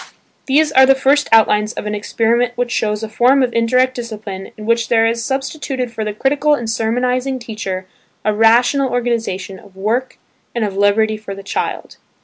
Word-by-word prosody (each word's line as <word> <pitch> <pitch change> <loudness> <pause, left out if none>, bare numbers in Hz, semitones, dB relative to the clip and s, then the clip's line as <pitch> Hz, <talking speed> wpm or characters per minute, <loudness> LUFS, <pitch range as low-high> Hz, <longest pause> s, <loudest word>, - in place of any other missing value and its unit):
These 300 +3 +3
are 265 -2 +6
the 270 - +6
first 275 +2 +2
outlines 215 -1 +4
of - - -6
an 210 - -3
experiment 230 +3 0
which 245 -1 -1
shows 210 -2 -1
a - - -3
form 250 +5 +3
of 245 - -1
indirect 255 +3 +2
discipline 215 -5 -7
in 215 - -8
which 230 0 +1
there 225 -1 +3
is 230 0 0
substituted 270 -1 -3
for 220 -1 -4
the 210 - -2
critical 285 +7 +1
and 240 -5 -5
sermonizing 250 +4 -1
teacher 215 -6 -5 0.4
a 215 - +2
rational 240 +5 +3
organisation 225 -6 -2
of 190 - -18
work 225 +7 -2 0.4
and 235 -2 0
of 200 -2 -5
liberty 215 +2 +2
for 205 -2 -8
the 195 - -10
child. 200 - -4
230 Hz, 180 wpm, -17 LUFS, 215-255 Hz, 0.4 s, are